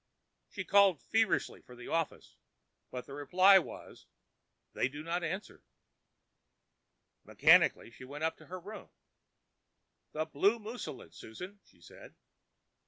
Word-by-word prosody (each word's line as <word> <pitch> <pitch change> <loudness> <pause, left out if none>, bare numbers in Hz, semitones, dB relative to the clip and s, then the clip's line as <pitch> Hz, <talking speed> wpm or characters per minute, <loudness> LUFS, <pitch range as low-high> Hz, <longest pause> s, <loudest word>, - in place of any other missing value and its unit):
She 190 - -6
called 195 -5 +5
feverishly 225 0 0
for 125 - -15
the 120 - -11
office, 165 -1 -3 0.5
but 125 -1 -7
the 140 - -11
reply 185 +7 +5
was, 170 - -10 0.7
"They - - 0
do 145 +3 -8
not 170 +2 -2
answer." 185 +5 -5 1.6
Mechanically - - +4
she 130 - -13
went 145 +4 -8
up 160 0 0
to - - -17
her 185 +1 -7
room. 205 +5 -10 1.2
"The 155 +1 -2
blue 190 +9 +2
mousseline, 220 - -8
Susan," 180 - -10
she - - -26
said. - - -15
170 Hz, 125 wpm, -32 LUFS, 145-200 Hz, 1.6 s, called